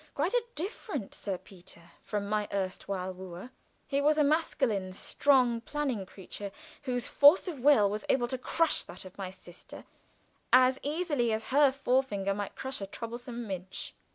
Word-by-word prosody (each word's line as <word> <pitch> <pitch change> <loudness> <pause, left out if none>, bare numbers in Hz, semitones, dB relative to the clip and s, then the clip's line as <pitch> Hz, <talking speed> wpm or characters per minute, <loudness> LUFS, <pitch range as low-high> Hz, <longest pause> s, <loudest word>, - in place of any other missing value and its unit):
Quite 320 +9 0
a - - +4
different 360 - -4
Sir 195 -3 -3
Peter 175 -2 -15
from 205 -1 -3
my 210 0 0
erstwhile 190 -1 -3
wooer. 185 +5 -9 0.3
He 280 0 0
was 300 +1 +3
a 300 - +5
masculine, 265 - +1
strong, 250 +2 +3
planning 260 -8 -2
creature, 195 +1 -8 0.4
whose 245 -1 0
force 295 +7 +6
of 325 -7 -4
will 245 -6 +6
was 210 +2 -3
able 240 -2 +3
to 260 - -2
crush 330 +5 +2
that 185 - -11
of 185 - -11
my 190 -2 -3
sister 180 -2 -12 0.7
as 255 +1 +6
easily 290 -6 0
as 220 0 -2
her 285 -1 +6
forefinger 255 -7 0
might 205 0 -5
crush 265 -4 -4
a 195 - -4
troublesome 235 +3 -6
midge. 190 -2 -6
235 Hz, 160 wpm, -30 LUFS, 195-280 Hz, 0.7 s, force